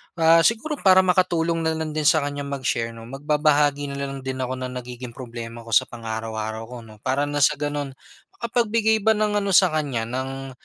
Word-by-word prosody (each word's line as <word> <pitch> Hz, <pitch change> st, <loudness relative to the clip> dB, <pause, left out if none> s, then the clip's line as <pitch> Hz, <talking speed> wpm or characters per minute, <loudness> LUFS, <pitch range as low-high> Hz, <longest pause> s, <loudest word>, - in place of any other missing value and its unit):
Ah, 165 Hz, -1 st, +5 dB
siguro 235 Hz, -, +1 dB
para 190 Hz, -1 st, +6 dB
makatulong 175 Hz, -2 st, +1 dB
nalang 160 Hz, -1 st, -1 dB
din 155 Hz, -1 st, 0 dB
sa 155 Hz, 0 st, +4 dB
kanya 145 Hz, 0 st, -4 dB
mag-share, 120 Hz, -4 st, -2 dB
'no, 115 Hz, -, -10 dB
magbabahagi 145 Hz, +2 st, +1 dB
nalang 140 Hz, -1 st, -5 dB
din 130 Hz, 0 st, -4 dB
ako 130 Hz, 0 st, -2 dB
na 130 Hz, 0 st, -5 dB
nagiging 125 Hz, -1 st, -7 dB
problema 115 Hz, -2 st, -8 dB
ko 115 Hz, -, +1 dB
sa -, -, +6 dB
pang-araw-araw 110 Hz, -1 st, -5 dB
ko, -, -, -7 dB
'no, 110 Hz, -2 st, -13 dB
para 140 Hz, +3 st, 0 dB
ng 145 Hz, 0 st, 0 dB
sa 150 Hz, 0 st, +3 dB
gano'n 145 Hz, -1 st, -3 dB, 0.5 s
makapagbigay 230 Hz, -2 st, +1 dB
ba 220 Hz, -, +5 dB
ng 210 Hz, -1 st, +1 dB
ano 200 Hz, -1 st, -2 dB
sa 185 Hz, -2 st, +6 dB
kanya 145 Hz, -7 st, -1 dB
ng, 135 Hz, +3 st, -5 dB
145 Hz, 185 wpm, -23 LUFS, 125-165 Hz, 0.5 s, para